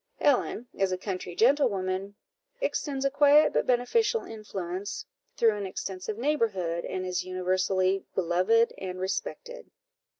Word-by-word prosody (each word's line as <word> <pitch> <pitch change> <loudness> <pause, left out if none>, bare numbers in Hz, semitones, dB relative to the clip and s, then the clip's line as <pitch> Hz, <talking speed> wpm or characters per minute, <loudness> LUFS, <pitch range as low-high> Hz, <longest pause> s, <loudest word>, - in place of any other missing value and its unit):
Ellen, 255 -4 +2
as 195 -1 +2
a 185 - 0
country 185 -2 -5
gentlewoman, 200 -7 +2 0.4
extends 280 - -2
a 275 - +2
quiet 290 +2 +5
but - - +1
beneficial 435 - +2
influence 200 -3 -5 0.3
through 225 -2 +4
an 200 -1 -4
extensive 190 +2 -5
neighbourhood, 210 - 0
and 185 0 -3
is 180 -1 -1
universally 185 +1 0
beloved 185 +6 +3
and 185 -1 -5
respected. - - -4
195 Hz, 125 wpm, -28 LUFS, 185-255 Hz, 0.4 s, quiet